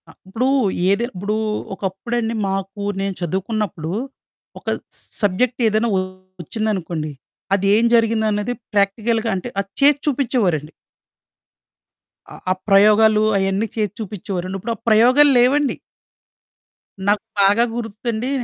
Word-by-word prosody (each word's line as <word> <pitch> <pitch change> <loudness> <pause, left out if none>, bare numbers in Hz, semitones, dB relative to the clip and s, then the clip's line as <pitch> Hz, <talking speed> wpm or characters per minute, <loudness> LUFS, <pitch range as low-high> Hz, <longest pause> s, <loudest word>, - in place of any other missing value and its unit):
అ! - - -12 0.2
ఇప్పుడూ 225 +7 -1 0.4
ఏది 200 +4 +2
ఇప్పుడూ 200 +3 -3 0.4
ఒకప్పుడండి, 225 +5 -3
మాకూ 195 +1 -4 0.2
నేను 195 0 -1
చదువుకున్నప్పుడు 190 -1 -2 0.7
ఒక - - -30 0.5
సబ్జెక్ట్ 220 +5 +1
ఏదైనా 220 +2 +1 0.5
ఒచ్చిందనుకోండి, 175 -6 -3 0.4
అదేం 200 +3 +3
జరిగిందన్నది 220 0 +1 0.2
ప్రాక్టికల్‌గా 220 +3 +1
అంటే, 190 +6 -4
అది 200 -1 -3
చేసి 285 0 +6
చూపిచ్చేవోరండి. 220 - 0 1.6
ఆ! - - -10 0.2
ఆ - - +5 0.2
ప్రయోగాలు, 215 +2 +5
అయన్నీ 195 +3 0
చేసి 210 -3 -1
చూపిచ్చేవోరండి. 195 -3 -4
ఇప్పుడు 230 +5 -3
ఆ - - -20
ప్రయోగాలు 250 +7 +6
లేవండి. 275 +3 +3 1.3
నాకు 205 0 +2 0.2
బాగా 205 +4 +5
గుర్తండీ, 230 +1 -3
210 Hz, 105 wpm, -20 LUFS, 195-230 Hz, 1.6 s, చేసి